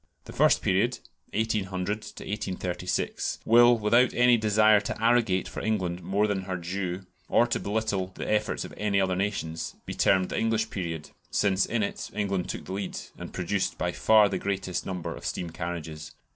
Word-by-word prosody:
The - - -10
first - - +4
period 105 +7 +2 0.4
(1800 105 -3 -1 0.3
1836), 90 -3 -2
will, 120 +1 +7
without 115 +3 +3
any 125 0 +6
desire 110 -1 +4
to 100 - -4
arrogate 115 -5 +2
for - - -6
England 90 -5 -1
more 100 +3 +1
than 100 -3 -1
her 95 -1 -3
due 90 +1 -4 0.2
or 120 - +5
to 120 - -1
belittle 100 -3 -1
the - - -5
efforts 105 +1 0
of - - -10
any 105 -2 +1
other 95 -1 +1
nations, 90 -4 -3
be - - -5
termed 95 -1 +3
the - - -2
English 110 -1 0
period, 85 -5 -4 0.2
since 100 -2 +2
in 115 -2 0
it - - -4
England 100 -3 -1
took - - -5
the 95 - -6
lead, 100 0 -4 0.2
and - - -7
produced 95 +2 -1
by 90 - -1
far 110 +3 +5
the - - -2
greatest 95 -3 -2
number 90 -3 -4
of - - -11
steam 85 -2 -3
carriages. 80 -2 -6
100 Hz, 175 wpm, -27 LUFS, 90-110 Hz, 0.4 s, will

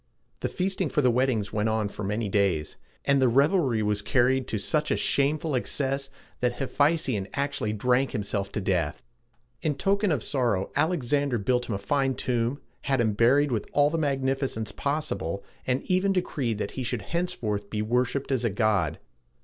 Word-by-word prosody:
The - - -2
feasting 185 -2 -1
for 150 - +1
the 125 - +5
weddings 120 -4 0
went 105 +1 +1
on 110 -1 0
for 105 - -7
many 105 +3 -1
days, 95 -6 +1 0.3
and 140 -1 +3
the 130 - +5
revelry 135 - +3
was 105 0 0
carried 130 +4 +2
to 110 - -1
such 150 +9 0
a - - +1
shameful 150 +2 +1
excess, 135 +2 -1 0.3
that 125 -1 +1
Hephæstion 135 -7 +1
actually 140 -6 -1
drank 125 +5 +2
himself 100 -3 -2
to 105 - -2
death. 90 -5 -1 0.6
In 155 -3 0
token 200 +2 +1
of 145 -8 0
sorrow, 120 -9 0
Alexander 145 -4 +1
built 125 +4 0
him 105 - 0
a - - -1
fine 135 +6 0
tomb, 120 +3 -1 0.3
had 135 -2 +1
him 110 -3 +2
buried 130 +7 +4
with 110 -4 -1
all 145 0 +4
the 165 - 0
magnificence 135 -5 -1
possible, 140 - -2 0.2
and 130 +1 0
even 185 +2 +2
decreed 135 - -1
that 105 - -3
he 130 - -5
should 120 -3 -2
henceforth 115 - -2
be 105 -1 -2
worshiped 125 +5 0
as 130 -3 +1
a 115 - +2
god. 100 - +1
125 Hz, 175 wpm, -27 LUFS, 105-145 Hz, 0.6 s, the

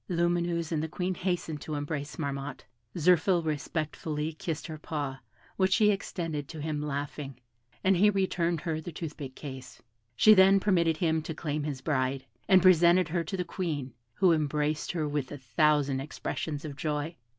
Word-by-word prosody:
Lumineuse 170 -1 0
and 155 -2 0
the 160 - -2
Queen 180 +3 -2
hastened 175 -4 -2
to 155 - -4
embrace 145 0 -4
Marmotte, 140 -2 -4 0.3
Zirphil 175 +1 +3
respectfully 155 +1 -2
kissed 160 0 -4
her 155 -2 -7
paw, 145 -4 -4 0.4
which 190 0 +3
she 210 +2 +5
extended 165 -7 -3
to 160 - -8
him, 150 0 -2
laughing; 140 -2 -4 0.4
and 190 0 +4
he 205 +4 +5
returned 175 -4 0
her 160 -3 -2
the 175 - -7
toothpick 150 -5 -7
case. 130 -3 -9 0.4
She 215 - +7
then 195 0 +6
permitted 170 -5 +2
him 160 -1 +1
to 160 0 -6
claim 150 -1 -3
his 140 -4 -4
bride, 135 -3 -1 0.2
and 185 -2 +6
presented 175 0 +6
her 170 +1 0
to 190 +4 -4
the 180 - -2
Queen, 150 -9 -3 0.2
who 185 -2 +4
embraced 150 0 0
her 160 -3 -1
with 145 -3 -2
a 145 - -5
thousand 140 +2 +2
expressions 150 +1 -4
of 145 -2 -6
joy. 150 +2 -2
155 Hz, 170 wpm, -29 LUFS, 145-175 Hz, 0.4 s, She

